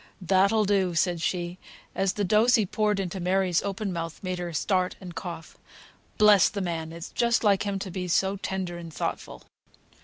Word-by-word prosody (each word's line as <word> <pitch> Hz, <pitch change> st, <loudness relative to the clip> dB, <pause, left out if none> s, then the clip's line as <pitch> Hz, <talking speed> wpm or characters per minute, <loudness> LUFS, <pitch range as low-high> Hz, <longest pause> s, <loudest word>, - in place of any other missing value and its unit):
"That'll 195 Hz, +4 st, +3 dB
do!" 190 Hz, -3 st, +1 dB
said 175 Hz, 0 st, +1 dB
she, 175 Hz, +1 st, -2 dB, 0.3 s
as 195 Hz, -1 st, 0 dB
the 205 Hz, -, -2 dB
dose 215 Hz, +6 st, +4 dB
he 220 Hz, -4 st, +2 dB
poured 210 Hz, +1 st, 0 dB
into 190 Hz, 0 st, -3 dB
Mary's 185 Hz, -1 st, +1 dB
open 200 Hz, 0 st, -3 dB
mouth 165 Hz, -1 st, -5 dB
made 185 Hz, -1 st, -3 dB
her 175 Hz, -1 st, -4 dB
start 185 Hz, +3 st, 0 dB
and 180 Hz, -2 st, -9 dB
cough. 165 Hz, -3 st, -8 dB, 0.6 s
"Bless 210 Hz, -2 st, +6 dB
the 205 Hz, -, -5 dB
man! 165 Hz, -4 st, -3 dB
It's 170 Hz, +1 st, -8 dB
just 235 Hz, -1 st, +1 dB
like 205 Hz, -1 st, +3 dB
him 200 Hz, -1 st, -1 dB
to 190 Hz, -1 st, -6 dB
be 180 Hz, 0 st, -4 dB
so 190 Hz, +3 st, +1 dB
tender 185 Hz, -3 st, -4 dB
and 165 Hz, -1 st, -9 dB
thoughtful!" 60 Hz, -, -5 dB
185 Hz, 185 wpm, -26 LUFS, 175-200 Hz, 0.6 s, Bless